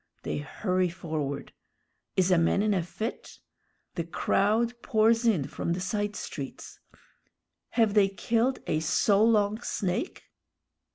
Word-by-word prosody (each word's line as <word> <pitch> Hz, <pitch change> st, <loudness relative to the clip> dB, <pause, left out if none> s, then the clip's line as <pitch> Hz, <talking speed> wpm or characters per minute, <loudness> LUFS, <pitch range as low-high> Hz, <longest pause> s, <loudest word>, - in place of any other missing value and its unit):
They -, -, -2 dB
hurry 185 Hz, +4 st, -1 dB
forward. 155 Hz, -5 st, -4 dB, 0.6 s
Is 185 Hz, 0 st, +3 dB
a 180 Hz, -, +5 dB
man 170 Hz, +4 st, +2 dB
in 215 Hz, -1 st, +2 dB
a 185 Hz, -, +1 dB
fit? 215 Hz, +7 st, -6 dB, 0.6 s
The 170 Hz, -, -2 dB
crowd 220 Hz, +7 st, +1 dB
pours 225 Hz, +2 st, +3 dB
in 180 Hz, -12 st, +2 dB
from 170 Hz, -, -2 dB
the 175 Hz, -, -3 dB
side 205 Hz, +2 st, -2 dB
streets. 140 Hz, -8 st, -7 dB, 1.0 s
Have 225 Hz, -3 st, +4 dB
they 200 Hz, -2 st, +5 dB
killed 230 Hz, +6 st, 0 dB
a 155 Hz, -, 0 dB
so 200 Hz, +6 st, +3 dB
long 215 Hz, -1 st, +3 dB
snake? 190 Hz, -, -3 dB
200 Hz, 130 wpm, -28 LUFS, 175-220 Hz, 1.0 s, a